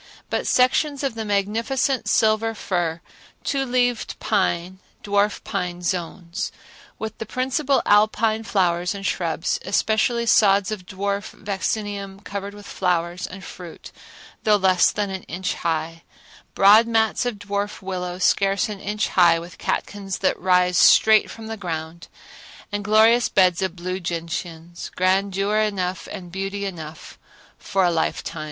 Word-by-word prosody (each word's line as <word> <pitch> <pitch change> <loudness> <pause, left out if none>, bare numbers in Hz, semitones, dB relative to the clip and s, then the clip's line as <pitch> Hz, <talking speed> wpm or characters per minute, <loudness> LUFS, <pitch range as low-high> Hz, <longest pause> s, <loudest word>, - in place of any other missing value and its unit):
but - - -1
sections 275 +3 +2
of 270 -3 -1
the 225 -1 -4
magnificent 225 +6 0
silver 220 +1 +2
fir, 170 -5 -2 0.4
two 275 -1 0
leaved 245 -2 0
pine, 185 -3 0 0.2
and - - -37
dwarf 205 0 +1
pine 180 -2 -4
zones; 170 0 -3 0.5
with 220 0 -5
the 225 - -4
principal 265 +3 0
alpine 215 +1 +3
flowers 180 -3 0
and 195 0 -7
shrubs, 165 -4 -1
especially 220 +4 +1
sods 200 -3 +4
of 190 -4 -6
dwarf 200 +1 -3
vaccinium 200 0 -3
covered 200 0 -6
with 205 0 -12
flowers 175 -1 -1
and 190 0 -10
fruit 175 -3 -10 0.5
though 215 -1 +4
less 185 -2 +4
than 205 -2 -2
an 190 -1 -4
inch 180 +2 -3
high, 165 0 -3 0.5
broad 210 +4 +7
mats 225 -1 +1
of 245 -2 -2
dwarf 205 0 -4
willow 180 -1 -4
scarce 195 +2 +2
an 205 -2 -6
inch 210 +2 -2
high 170 -2 +5
with 170 +1 -9
catkins 195 -2 -3
that 190 - 0
rise 180 0 +3
straight 220 -1 +6
from 225 - -9
the 225 0 -5
ground, 165 -3 -6 0.6
and 205 0 -3
glorious 220 +3 +4
beds 185 -2 +3
of 190 -2 -2
blue 185 +1 -4
gentians,—grandeur 180 +4 -2
enough 190 -4 -1
and 180 -4 -8
beauty 195 +2 -3
enough 160 -5 -8 0.4
for 195 -1 0
a 175 - +3
lifetime. 165 0 -2
195 Hz, 140 wpm, -23 LUFS, 180-215 Hz, 0.6 s, broad